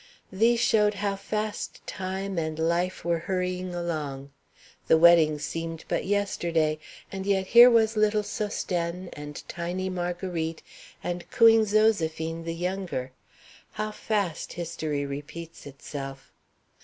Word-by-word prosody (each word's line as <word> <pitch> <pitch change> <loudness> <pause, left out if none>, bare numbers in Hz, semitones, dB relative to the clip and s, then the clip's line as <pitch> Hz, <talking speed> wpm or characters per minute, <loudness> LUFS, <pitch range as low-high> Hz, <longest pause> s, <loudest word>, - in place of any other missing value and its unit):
These 230 +5 +3
showed 210 -2 +3
how 200 -1 -1
fast 210 +2 -4
time 190 0 -3
and 155 -1 -3
life 170 +3 0
were 170 -1 +1
hurrying 180 0 -2
along. 150 -5 -4 0.6
The 160 - +6
wedding 160 -2 +6
seemed 165 +2 -5
but - - -1
yesterday, 170 -6 0 0.3
and 195 0 -5
yet 195 -1 +2
here 240 +5 +9
was 225 -2 +3
little 215 0 +2
Sosthène, 180 -4 -3
and 150 0 -8
tiny 180 +2 -3
Marguerite, 175 -2 -3 0.4
and 175 0 -4
cooing 225 -1 +6
Zoséphine 165 -6 +1
the 165 0 -3
younger 175 -7 -3 0.6
how 215 +1 -3
fast 205 -6 -2
history 160 -4 -3
repeats 150 +4 -8
itself! 135 -1 -8
175 Hz, 120 wpm, -27 LUFS, 160-200 Hz, 0.6 s, here